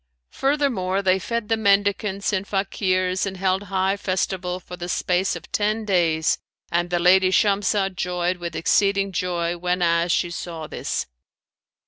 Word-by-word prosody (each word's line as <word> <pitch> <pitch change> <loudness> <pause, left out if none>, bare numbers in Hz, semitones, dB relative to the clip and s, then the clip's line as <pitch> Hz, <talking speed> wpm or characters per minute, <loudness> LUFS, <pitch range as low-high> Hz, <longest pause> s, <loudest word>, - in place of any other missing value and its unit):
Furthermore, 245 -10 0
they 190 0 +3
fed 230 +2 -3
the 225 - +2
mendicants 200 -1 +1
and 195 0 -1
Fakirs 185 -1 0
and 190 -1 -5
held 190 +1 0
high 190 0 0
festival 185 -2 -2
for 180 - -9
the 175 0 -6
space 180 +2 0
of - - -10
ten 215 +1 0
days, 165 -5 +2 0.3
and 175 +1 0
the 175 - +1
lady 185 +2 +5
Shamsah 195 0 +2
joyed 180 -1 -1
with 170 -2 -6
exceeding 195 +6 +2
joy 175 -2 -1
whenas 175 -1 +1
she 175 0 +1
saw 170 -2 -6
this. - - -3
185 Hz, 145 wpm, -23 LUFS, 175-200 Hz, 0.3 s, lady